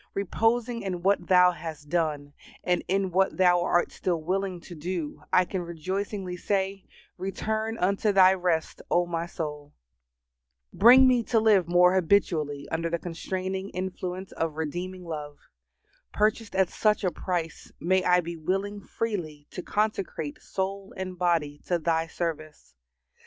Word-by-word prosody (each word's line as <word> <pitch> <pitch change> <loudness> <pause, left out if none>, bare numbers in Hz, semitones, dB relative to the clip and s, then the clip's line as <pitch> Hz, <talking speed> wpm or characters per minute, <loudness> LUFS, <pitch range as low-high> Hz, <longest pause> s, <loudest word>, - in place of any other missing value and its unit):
Reposing 225 +4 0
in 180 -3 -4
what 195 -2 +2
Thou 180 -1 +6
has 160 -4 -7
done, 150 -2 -2 0.3
and 180 -1 +1
in 190 0 0
what 190 +2 +2
Thou 180 -1 +4
art 175 0 +1
still 175 -3 -1
willing 185 +2 -2
to 175 - -11
do, 165 -1 -4
I 185 - +5
can 185 0 -3
rejoicingly 185 +3 -4
say, 195 +1 -2 0.3
"Return 220 +3 -2
unto 200 +3 +1
thy 190 -1 +7
rest, 175 -4 -1
O 175 0 +3
my 170 -1 -3
soul." 150 -3 -6 1.0
Bring 250 +6 +8
me 250 -2 +4
to 230 - +2
live 210 -5 +4
more 180 +1 +5
habitually 160 -6 +1
under 165 +1 -1
the 170 - 0
constraining 185 +3 -4
influence 185 0 -4
of 165 -2 -2
redeeming 180 +4 -4
love. 150 -3 -6 0.7
Purchased 215 0 0
at 190 -2 +3
such 215 -1 +1
a 185 - +1
price, 170 -4 -4
may 185 +2 +2
I 180 0 +4
be 170 0 -6
willing 195 +5 -2
freely 180 -10 -4
to - - -5
consecrate 195 -8 -2
soul 195 +1 -4
and 185 -1 -4
body 165 -5 0
to 175 - +2
Thy 165 0 0
service. 155 - -5
180 Hz, 145 wpm, -27 LUFS, 165-195 Hz, 1.0 s, Bring